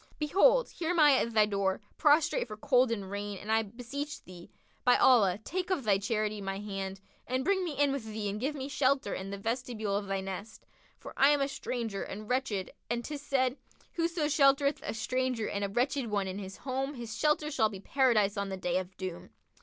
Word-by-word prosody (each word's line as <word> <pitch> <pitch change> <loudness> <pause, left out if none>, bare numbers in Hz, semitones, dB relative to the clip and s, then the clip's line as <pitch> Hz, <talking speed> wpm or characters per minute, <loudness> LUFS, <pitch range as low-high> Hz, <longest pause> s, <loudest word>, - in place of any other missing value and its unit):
Behold, 440 +11 +4
here 330 -2 -4
am 355 -1 +1
I 300 -2 +8
at 235 - 0
thy 215 -1 +6
door, 195 -2 0 0.2
prostrate 300 -3 +3
for 215 -1 -8
cold 255 0 +3
and 200 -4 -3
rain 205 0 -4
and 210 +3 -5
I 220 0 +4
beseech 260 +8 -6
thee, 175 -1 -12 0.3
by 245 - +5
Allah, 205 -8 +5
take 365 +7 -3
of 365 -8 0
thy 200 -3 +3
charity 215 0 -1
my 195 0 -3
hand 195 -1 -5 0.3
and 255 +1 -1
bring 390 -1 +2
me 340 -4 -3
in 285 -1 +4
with 270 -5 -3
thee 215 -1 -4
and 200 +1 -3
give 280 +6 -2
me 270 -1 -4
shelter 275 -5 +1
in 190 +1 -5
the 200 - -5
vestibule 225 -1 -2
of 200 0 -2
thy 195 0 -1
nest; 195 +3 -7 0.3
for - - -10
I 275 - +5
am 290 -1 +4
a 275 - +2
stranger 235 -7 -4
and 210 +2 -6
wretched 250 -7 -1 0.2
and 240 0 -2
'tis 295 -2 -5
said, 260 -2 0 0.4
'Whoso 335 -2 0
sheltereth 280 -1 +3
a - - -4
stranger 255 -1 -1
and 200 - -2
a 200 - -1
wretched 255 +4 0
one 200 -2 -1
in 190 +1 -4
his 190 -1 -8
home 270 +2 -3
his 235 -3 -6
shelter 300 +3 +1
shall 220 -6 +2
be 200 -3 -8
Paradise 215 -4 +2
on 200 0 -2
the 190 - -4
Day 180 0 0
of 185 0 -8
Doom.' 185 -2 -6
230 Hz, 215 wpm, -30 LUFS, 200-280 Hz, 0.4 s, I